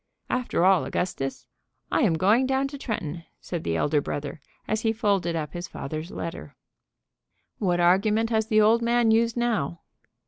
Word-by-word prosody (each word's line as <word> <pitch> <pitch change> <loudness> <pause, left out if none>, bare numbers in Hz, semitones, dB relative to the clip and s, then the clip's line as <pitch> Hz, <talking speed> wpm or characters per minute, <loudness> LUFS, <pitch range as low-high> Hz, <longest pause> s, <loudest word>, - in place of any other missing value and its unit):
"After 250 -8 +1
all, 190 -2 +5
Augustus, 135 -7 -3 0.5
I - - +2
am 165 - +3
going 210 +10 +3
down 270 +1 +1
to 280 - -7
Tretton," 170 - -4 0.2
said 175 -3 -5
the 80 - -1
elder 145 - +1
brother 145 +1 -5 0.3
as 215 0 0
he 225 - +2
folded 200 -7 0
up 155 -2 -4
his 175 0 -5
father's 155 +3 -6
letter. 120 - -7 1.0
"What 175 -3 +1
argument 210 +6 +3
has 220 -1 +1
the 215 -2 +4
old 225 +2 +4
man 235 -1 +3
used 230 +1 +2
now?" 215 -10 -1
195 Hz, 165 wpm, -25 LUFS, 165-225 Hz, 1.0 s, all